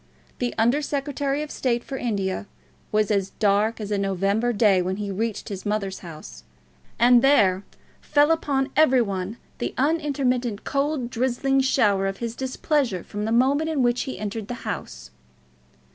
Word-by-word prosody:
The 245 -1 -2
Under 240 +6 +3
Secretary 285 0 -2
of 305 - -8
State 240 -2 -1
for 270 - -6
India 200 -6 -2 0.4
was 215 0 +2
as 195 -2 +1
dark 210 +2 +2
as 210 -1 -5
a 205 - +1
November 195 +4 +1
day 205 -4 +3
when 185 +1 -2
he 205 0 -4
reached 220 +3 -3
his 195 -2 -6
mother's 205 -2 -2
house, 155 - -10 0.5
and 240 0 +6
there 205 -9 +4 0.4
fell 290 +1 +3
upon 280 -4 0
every 265 -5 +5
one 195 +1 -4 0.2
the - - -3
unintermittent 265 -6 0
cold 275 -3 -1
drizzling 260 +2 +1
shower 205 -7 +2
of 195 0 -3
his 235 -1 -4
displeasure 260 - -1
from 210 +1 -5
the 220 - -2
moment 275 +7 +2
in 295 -5 +1
which 240 0 +1
he - - -5
entered 210 0 -5
the 245 +1 -7
house. 65 0 -6
235 Hz, 160 wpm, -24 LUFS, 200-270 Hz, 0.5 s, and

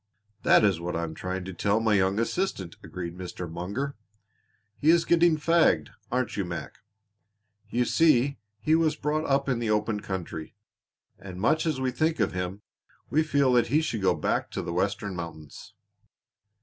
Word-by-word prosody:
"That - - +5
is 100 -5 +3
what 85 +1 -4
I 85 - -1
am 80 -1 -4
trying 90 +2 -4
to 95 - -6
tell 100 +5 +1
my 110 -1 +2
young 95 0 +2
assistant," 115 - -2
agreed 85 -1 -6
Mr. 90 -1 -6
Munger. 100 - -4 0.8
"He 150 - +3
is 165 0 +5
getting 170 -1 +4
fagged, 160 - +3 0.2
aren't 125 +1 -1
you, 100 - 0
Mac? 85 -2 -6 0.9
You 120 +1 +1
see 140 -4 +3 0.2
he 155 - +1
was 160 -2 +3
brought 155 +1 -1
up 140 0 +1
in 125 -3 0
the 115 -2 -1
open 105 0 +1
country, 95 -6 -6 0.6
and 95 -2 -9
much 155 - +2
as 155 -4 0
we 130 -1 0
think 155 +5 0
of 110 - +2
him, 90 +2 -4 0.5
we 155 - +4
feel 140 -4 +2
that 120 -2 +4
he 145 +6 +3
should 145 -9 -2
go 95 - +3
back - - -1
to - - -4
the 85 - -4
Western 100 +1 -1
mountains." 80 -4 -9
110 Hz, 175 wpm, -27 LUFS, 90-145 Hz, 0.9 s, That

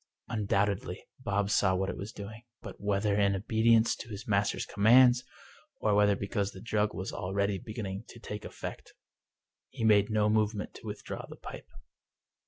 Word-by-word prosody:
Undoubtedly 100 -3 -1
Bob 105 -4 0
saw 95 -2 +3
what 95 +1 0
it - - -6
was 100 +3 -6
doing; 110 +2 -8 0.2
but, - - -9
whether 100 0 +1
in 100 -1 +3
obedience 110 +3 +3
to - - -9
his 100 0 -7
master's 100 -1 +1
com 100 0 -3
mands, 125 +1 +7 0.6
or 105 - +2
whether 105 0 +4
because 100 0 -2
the 95 - -10
drug 105 0 0
was 95 - -4
already 100 +1 -1
beginning 105 -1 -5
to 120 - -12
take 105 -2 -6
effect, - - -8 0.8
he - - -6
made 105 -1 +5
no 105 -1 +2
movement 105 -1 0
to 110 - -11
withdraw 105 -1 -6
the - - -10
pipe. - - -10
105 Hz, 170 wpm, -30 LUFS, 100-110 Hz, 0.8 s, mands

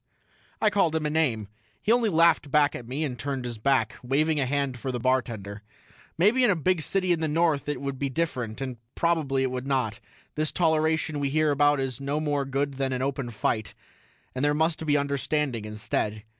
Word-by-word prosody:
I 215 - +3
called 175 -6 +2
him 160 -1 0
a 150 - 0
name. 130 -10 0 0.3
He 215 - 0
only 235 -2 +3
laughed 165 -4 +4
back 145 0 +3
at 120 - -7
me 135 +5 -2
and 125 -5 -4
turned 135 -2 -3
his 120 -2 -5
back, 135 +4 +1
waving 150 +5 +1
a 135 - +1
hand 140 -2 -1
for 130 +2 -3
the 125 - -3
bartender. 115 -5 -1 0.6
Maybe 215 +9 +4
in 245 - +5
a 200 - +4
big 175 +1 +1
city 185 +3 0
in 170 - +2
the 160 - 0
North 155 -2 +1
it 145 - -2
would 140 -1 -4
be 140 - -1
different 130 -6 -2
and 130 -2 -4 0.2
probably 155 -6 +1
it 130 - 0
would 130 +1 -4
not: 125 -5 0 0.3
this 155 0 -1
toleration 160 -2 +1
we 140 -1 0
hear 155 +1 +2
about 145 0 +3
is 135 -2 -3
no 140 +2 -1
more 145 -2 0
good 135 0 -2
than 135 -1 -1
an 130 0 -1
open 135 -2 -2
fight, 110 -1 -2 0.6
and 130 - -3
there 145 0 +3
must 160 +1 0
be 145 0 +4
understanding 140 -4 -1
instead. 105 0 -3
140 Hz, 210 wpm, -26 LUFS, 130-155 Hz, 0.6 s, in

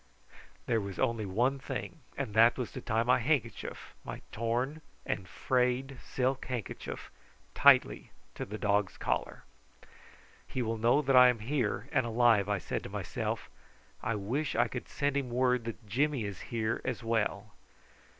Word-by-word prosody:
There 115 -2 +1
was 100 -1 -6
only 115 -5 0
one 125 +8 +1
thing, 135 - -5 0.2
and 130 -7 -3
that 115 +2 +6
was 125 -3 -3
to - - -7
tie 110 +1 +1
my 125 +2 +4
handkerchief, 135 0 -2
my - - -7
torn 120 +7 -1 0.2
and 95 - -2
frayed 125 +5 0
silk 130 +1 -1
handkerchief, 125 -5 -5 0.4
tightly - - +5 0.2
to - - -5
the 105 +2 -6
dog's 100 -2 +1
collar. - - -2 1.0
"He 130 - -2
will 115 -1 -2
know 120 +7 +4
that 135 -1 +2
I 125 0 +10
am 125 - +1
here, 120 0 -1
and 130 - +2
alive," 115 -3 +3
I 105 - +2
said 90 - -3
to - - -8
myself. - - -3 0.5
"I 115 - -1
wish 125 +10 -2
I - - +3
could 120 - -6
send 145 -1 -1
him 135 -3 -1
word 125 -1 +2
that 115 0 -6
Jimmy 135 +3 +1
is 100 -4 -5
here 115 0 -1
as 125 -2 -3
well." 110 -2 -1
120 Hz, 160 wpm, -31 LUFS, 110-130 Hz, 1.0 s, I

